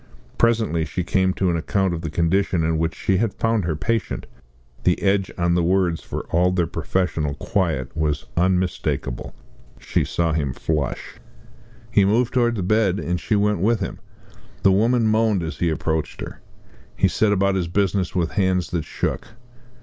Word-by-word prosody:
Presently 110 -8 +2
she 90 +2 -3
came 95 0 +2
to 95 -2 +1
an - - 0
account 95 +3 0
of 85 - -4
the 80 - -4
condition 85 +2 +1
in 80 0 +1
which 80 0 -1
she 95 - +1
had 110 0 0
found 115 -4 +1
her 80 -2 -1
patient. 115 +5 -2 0.6
The - - +2
edge 95 -1 +1
on 85 -1 +2
the 90 - +2
words, 90 -1 +1
for - - -5
all 90 +2 +3
their 90 -2 +1
professional 80 -2 -1
quiet, 80 - -1
was 75 -3 -1
unmistakable. 90 -8 -1 0.4
She - - 0
saw 85 -1 0
him 70 -5 -1
flush. 75 -1 -3 0.7
He 100 - +4
moved 115 +5 +2
towards 120 -2 +2
the 95 - -1
bed, 100 -1 +2
and 90 -2 -2
she 110 - 0
went 105 -2 +2
with 110 +4 +2
him. 95 - -4 0.6
The 95 - +6
woman 115 +4 +3
moaned 110 -4 +2
as 80 +1 -5
he 85 - +2
approached 80 0 -2
her. - - -8 0.5
He - - +3
set 110 -1 +2
about 100 -1 +2
his 90 -3 -1
business 95 0 0
with 85 -3 0
hands 95 -3 0
that 85 -3 -2
shook. - - -3
90 Hz, 175 wpm, -22 LUFS, 80-100 Hz, 0.7 s, The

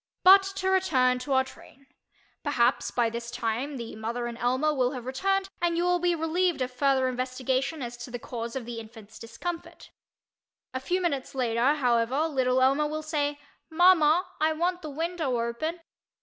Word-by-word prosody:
But 385 +2 +9
to 380 -1 -1
return 260 -10 +3
to 275 +2 -3
our 265 0 +4
train. 270 +1 -16 0.6
Perhaps 255 -4 +1
by 235 -2 +1
this 235 0 -5
time 240 +5 -3
the 235 -2 -7
mother 230 +2 -3
and 240 -1 -4
Elmer 260 +6 +1
will 255 -1 +1
have 250 -3 -7
returned 385 +9 0
and 340 -1 +1
you 345 - +1
will 355 0 +2
be 350 0 +1
relieved 330 -1 0
of 255 - -4
further 265 0 +2
investigation 255 +3 -2
as 240 0 -6
to 245 +1 -8
the 245 - -5
cause 235 0 -6
of 260 -3 -4
the 235 -1 -6
infant's 220 -1 -12
discomfort. 330 +10 -7 0.8
A 260 - -2
few 355 +8 -1
minutes 280 -7 -2
later, 245 +2 +2
however, 245 0 +1
little 260 -3 +1
Elmer 275 +3 +3
will 310 +1 -4
say 295 -2 -1 0.3
"Mama, 350 0 +5
I 315 +1 +2
want 350 +3 -1
the 310 - -6
window 315 -4 -2
open." 275 +9 -3
265 Hz, 180 wpm, -27 LUFS, 245-325 Hz, 0.8 s, But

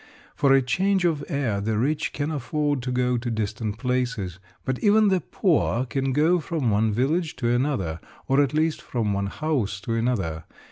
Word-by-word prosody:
For 140 -2 +2
a 135 0 +5
change 190 +8 +1
of 155 -4 +1
air 120 -8 -1
the 110 +1 -1
rich 145 +7 0
can 145 +2 -2
afford 145 0 -1
to 125 +1 -3
go 125 -1 +1
to 120 +1 -4
distant 110 -1 -3
places, 120 -7 -2 0.3
but 130 -1 -1
even 210 0 +4
the 190 -2 +2
poor 145 - +1
can 135 +3 -1
go 160 +6 +3
from 155 -7 -1
one 110 +2 +2
village 150 - 0
to 120 - -1
another, 120 - 0 0.3
or 135 +2 +4
at 140 -3 +1
least 155 +1 0
from 110 -4 -1
one 100 0 -1
house 120 -6 -2
to 115 +3 -3
another. 100 -10 -1
125 Hz, 185 wpm, -25 LUFS, 110-150 Hz, 0.3 s, a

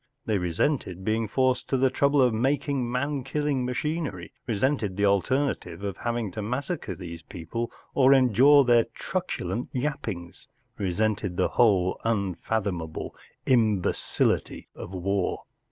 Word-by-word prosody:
They 105 -3 +1
resented 90 - -1
being 110 +1 0
forced 130 +3 +1
to 135 - +2
the 130 0 +3
trouble 140 +1 +3
of 125 -2 +3
making 135 +1 0
man 140 +2 -1
killing 140 -1 -1
machinery; 130 - -3
resented 115 -3 0
the 100 - +2
alternative 100 - 0
of 100 -3 -3
having 120 -4 -2
to 110 - -5
massacre 125 - -3
these 85 -2 -8
people 95 +8 -5 0.2
or 135 -1 +5
endure 135 +2 +6
their 120 -2 +4
truculent 180 -9 -3
yappings; 125 - -4 0.3
resented 100 0 -1
the - - +2
whole 95 -6 +3
unfathomable 95 -5 -2 0.3
imbecility 110 -7 +1
of - - -8
w'ar. 95 +1 -1
115 Hz, 125 wpm, -26 LUFS, 95-135 Hz, 0.3 s, endure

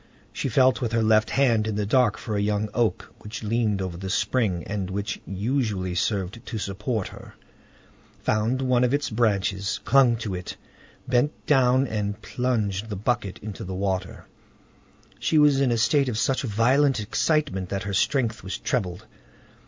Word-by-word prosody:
She - - -2
felt 130 +2 +3
with 115 -2 -2
her 115 -1 +2
left 110 0 +3
hand 115 -6 +2
in 110 - -2
the 105 0 -1
dark 120 0 +3
for 110 - -4
a 100 - 0
young 105 +1 0
oak 120 -2 -1
which 105 +1 -8
leaned 105 -3 0
over 90 -2 -5
the 95 +1 -5
spring, 100 -3 0
and 100 -3 -3
which 100 +3 -4
usually 100 -3 -1
served 95 +3 -2
to 115 - -5
support 105 +1 -3
her, - - -13 0.9
found 115 +5 +1
one 125 -1 +2
of 125 +3 +3
its 145 -4 -2
branches, 100 -2 0
clung 130 -4 +5
to 110 -4 -4
it, 90 0 -6 0.5
bent 125 +4 0
down, 130 -2 +4
and 105 -3 -3
plunged 110 -5 -2
the 105 - -3
bucket 105 -1 -1
in 105 - -4
the 95 0 -6
water. 95 -1 -3 0.9
She 160 - +1
was 145 -2 +5
in 130 -3 +2
a 120 - +1
state 135 +4 +2
of 110 - -3
such 130 +3 +1
violent 130 +4 +2
excitement 110 - 0
that 100 -1 -3
her 100 -1 -4
strength 115 +1 0
was 95 - -4
trebled. 90 -9 -2
110 Hz, 170 wpm, -25 LUFS, 100-125 Hz, 0.9 s, clung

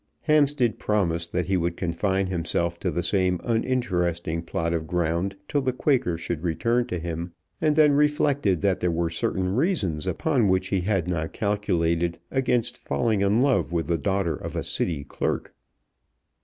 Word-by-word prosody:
Hampstead 145 -6 +2
promised 85 -5 0
that 90 -1 0
he 95 - 0
would 85 -1 -1
confine 95 +3 0
himself 85 -1 -1
to 95 - -1
the 85 0 -2
same 90 0 +1
uninteresting 90 -9 0
plot 85 0 -2
of 80 -1 -2
ground 90 +2 -1
till 145 - 0
the 130 -1 0
Quaker 125 - +1
should 85 -1 -4
return 115 +8 0
to 90 - -3
him, 85 +1 -5 0.3
and 155 -2 +3
then 150 -1 +6
reflected 145 - +2
that 95 -2 +1
there 90 - +1
were 85 0 -1
certain 95 +3 -1
reasons 105 - 0
upon 120 - +1
which 95 0 +1
he 95 -2 +1
had 95 -2 0
not 80 -3 -2
calculated 85 -5 0
against 125 -3 0
falling 110 -4 0
in 105 +5 +3
love 135 -10 +2
with 85 -1 0
the 85 -1 0
daughter 95 -4 0
of - - -7
a - - -1
City 75 -5 -2
clerk. 70 - -3
95 Hz, 170 wpm, -25 LUFS, 85-115 Hz, 0.3 s, then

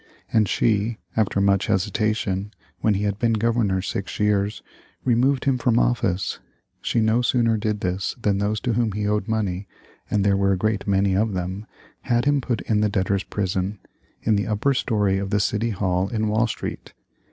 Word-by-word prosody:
And 110 -3 +3
she, 110 0 +1 0.2
after 105 -3 +1
much 100 -1 +2
hesitation, 105 0 -1 0.2
when 110 -2 +2
he 100 - -1
had 100 0 -1
been 115 0 +2
Governor 110 -4 +1
six 100 0 -4
years, 105 0 +1 0.4
removed 130 +2 +2
him 135 -2 +2
from 120 -1 +2
office. 110 -7 0 0.4
She - - 0
no 110 +2 +3
sooner 120 -2 +2
did 105 -1 -2
this, 90 +1 -2
than 100 -3 +1
those 105 +1 0
to 120 -2 0
whom 115 -2 +1
he 105 0 -2
owed 105 0 0
money, 100 -4 -1 0.4
and 105 - +1
there 100 -1 +4
were 100 0 +2
a - - 0
great 105 +1 -1
many 95 -1 +2
of 105 +2 +1
them, 95 +3 -4 0.3
had 120 0 +1
him 145 -1 +3
put 120 -2 -2
in 105 -2 +1
the 105 - +2
debtors' 100 0 0
prison, 95 0 -2 0.5
in 110 - +3
the 100 - 0
upper 110 +6 +1
story 105 -6 +1
of 100 0 -3
the 105 0 +1
City 105 +3 0
Hall 95 -2 0
in 110 -2 -1
Wall 110 +3 +2
Street. - - -6
105 Hz, 185 wpm, -23 LUFS, 100-115 Hz, 0.5 s, there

